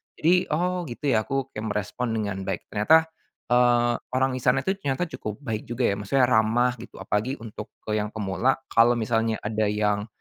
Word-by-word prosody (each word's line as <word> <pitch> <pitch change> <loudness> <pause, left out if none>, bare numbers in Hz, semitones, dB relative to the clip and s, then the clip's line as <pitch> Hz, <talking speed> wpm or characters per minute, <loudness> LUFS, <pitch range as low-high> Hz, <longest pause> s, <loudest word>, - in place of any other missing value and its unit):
jadi 180 +3 +3
oh 180 +1 -1
gitu 135 +3 -2
ya 110 -2 +1
aku 135 -1 -2
kayak 105 - -5
merespon 105 +4 -2
dengan 100 -3 -2
baik - - -3
ternyata, 160 +11 +5 0.5
eee, 120 -1 +4 0.2
orang 130 0 +2
disana 125 0 +2
itu 190 - +2
ternyata 140 -1 -1
cukup 105 +2 -5
baik 110 -3 -3
juga 120 +1 -2
ya 100 - +1
maksudnya 125 +6 +2
ramah 120 +1 +3
gitu - - -12
apalagi 115 +7 -1
untuk 110 -1 -8 0.2
ke 105 - -1
yang 105 - -3
pemula 105 +4 0
kalau 120 +1 +5
misalnya 110 -1 0
ada 110 0 0
yang, 105 0 0
120 Hz, 180 wpm, -25 LUFS, 105-130 Hz, 0.5 s, ternyata